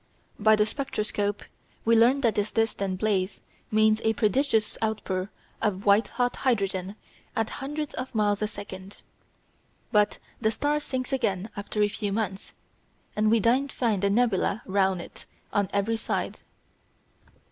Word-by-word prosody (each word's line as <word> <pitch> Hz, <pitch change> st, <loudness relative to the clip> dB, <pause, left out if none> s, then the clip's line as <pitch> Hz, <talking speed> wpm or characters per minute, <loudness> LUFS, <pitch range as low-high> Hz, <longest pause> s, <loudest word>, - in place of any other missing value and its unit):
By 215 Hz, +1 st, +6 dB
the 210 Hz, 0 st, +3 dB
spectroscope 210 Hz, -5 st, -2 dB, 0.4 s
we 230 Hz, +1 st, +5 dB
learn 245 Hz, +5 st, +5 dB
that 230 Hz, -4 st, +3 dB
this 205 Hz, 0 st, -1 dB
distant 200 Hz, -4 st, 0 dB
blaze 200 Hz, -2 st, 0 dB, 0.3 s
means 215 Hz, 0 st, +3 dB
a 220 Hz, -, +3 dB
prodigious 220 Hz, +1 st, +1 dB
outpour 205 Hz, -3 st, -1 dB, 0.3 s
of 200 Hz, -2 st, -1 dB
white 205 Hz, +2 st, +5 dB
hot 245 Hz, 0 st, -1 dB
hydrogen 195 Hz, -6 st, 0 dB, 0.4 s
at 225 Hz, -1 st, 0 dB
hundreds 295 Hz, +2 st, -4 dB
of 255 Hz, -1 st, -5 dB
miles 205 Hz, -1 st, +2 dB
a 215 Hz, -, +1 dB
second. 195 Hz, -2 st, -9 dB, 0.9 s
But 210 Hz, -2 st, +3 dB, 0.2 s
the 220 Hz, -, +3 dB
star 290 Hz, +6 st, 0 dB
sinks 260 Hz, -2 st, -3 dB
again 215 Hz, -5 st, -1 dB
after 210 Hz, +1 st, -1 dB
a -, -, +4 dB
few 205 Hz, 0 st, -3 dB
months, 195 Hz, -2 st, -3 dB, 0.6 s
and 215 Hz, 0 st, +3 dB
we 230 Hz, -, +5 dB
then 245 Hz, +6 st, +3 dB
find 225 Hz, -7 st, 0 dB
a 200 Hz, -, +4 dB
nebula 215 Hz, -2 st, +1 dB
round 190 Hz, -2 st, +1 dB
it -, -, -12 dB, 0.3 s
on 200 Hz, -2 st, +1 dB
every 215 Hz, +3 st, +1 dB
side. 225 Hz, -, -2 dB
215 Hz, 145 wpm, -27 LUFS, 200-230 Hz, 0.9 s, By